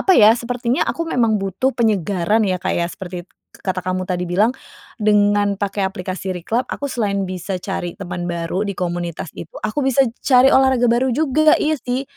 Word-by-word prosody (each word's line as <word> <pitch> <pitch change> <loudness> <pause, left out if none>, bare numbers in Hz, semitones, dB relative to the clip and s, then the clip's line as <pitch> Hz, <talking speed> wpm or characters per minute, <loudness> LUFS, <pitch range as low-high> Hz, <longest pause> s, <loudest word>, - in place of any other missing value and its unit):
apa 380 - +4
ya, 215 +1 +8
sepertinya 245 +1 -1
aku 335 - -2
memang 230 -6 +2
butuh 195 +8 -1
penyegaran 205 -2 +1
ya, 185 - +1
Kak, - - -1
ya, 170 0 +1
seperti 175 -2 -7 0.4
kata 185 -1 -2
k - - -24
kamu 185 0 -2
tadi 180 -1 -1
bilang. 200 +6 +3 0.5
Dengan 205 -1 +3
pakai 200 -1 -1
aplikasi 185 0 -5
Reclub, 220 +8 -1
aku 285 - -4
selain 200 -5 -1
bisa 185 +1 -4
cari 175 -3 -4
temen 180 -2 -5
baru 170 +3 -2
di 200 - -2
komunitas 175 -2 -3
itu, 160 - -9
aku 215 +7 -1
bisa 270 0 +2 0.2
cari 255 0 +6
olahraga 265 -2 +4
baru 250 +2 +2
juga. 310 +2 +4
Iya 310 0 +1
sih, 255 +1 -2
205 Hz, 180 wpm, -20 LUFS, 185-245 Hz, 0.5 s, ya